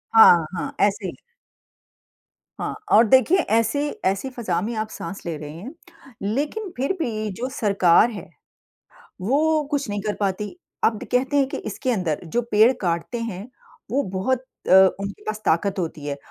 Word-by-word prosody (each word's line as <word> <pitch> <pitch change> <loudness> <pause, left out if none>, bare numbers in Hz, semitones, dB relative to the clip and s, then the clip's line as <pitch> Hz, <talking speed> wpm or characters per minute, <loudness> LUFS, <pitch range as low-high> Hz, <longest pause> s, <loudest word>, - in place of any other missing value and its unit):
हाँ, 175 -7 +8
हाँ। - - -4
ऐसे 200 0 -3
ही। 175 - -7 1.4
हाँ - - -3 0.2
और 225 - +7
देखिए 260 - +5 0.2
ऐसी 230 +5 +2 0.3
ऐसी 195 +7 0
फ़ज़ा 220 -9 -2
में 225 +5 -3
आप 215 0 -3
साँस 195 -1 -7
ले 170 -2 -3
रहे 150 0 -8
हैं। 185 - -9 0.5
लेकिन 290 - -2
फिर 275 +8 0
भी 215 -7 -2
जो 255 +2 -2
सरकार 200 -2 +4
है 210 - -8 0.9
वो 300 +9 +2
कुछ 285 -5 -1
नहीं 205 0 -2
कर 210 +1 -2
पाती। 200 0 -1 0.4
अब 220 -2 +2
कहते 260 +3 +1
हैं 275 -1 +3
कि - - -4
इसके 215 +4 -3
अंदर 180 -9 -1 0.2
जो 240 - +3
पेड़ 215 +4 +6
काटते 175 +6 -2
हैं 210 -2 -5 0.4
वो 280 +3 +1
बहुत 220 +8 -1 0.3
अ, - - +3 0.3
उनके 200 0 -6
पास 215 0 -4
ताकत 190 +4 +1
होती 160 -4 -4
है 140 -1 -3
215 Hz, 165 wpm, -23 LUFS, 190-255 Hz, 1.4 s, हाँ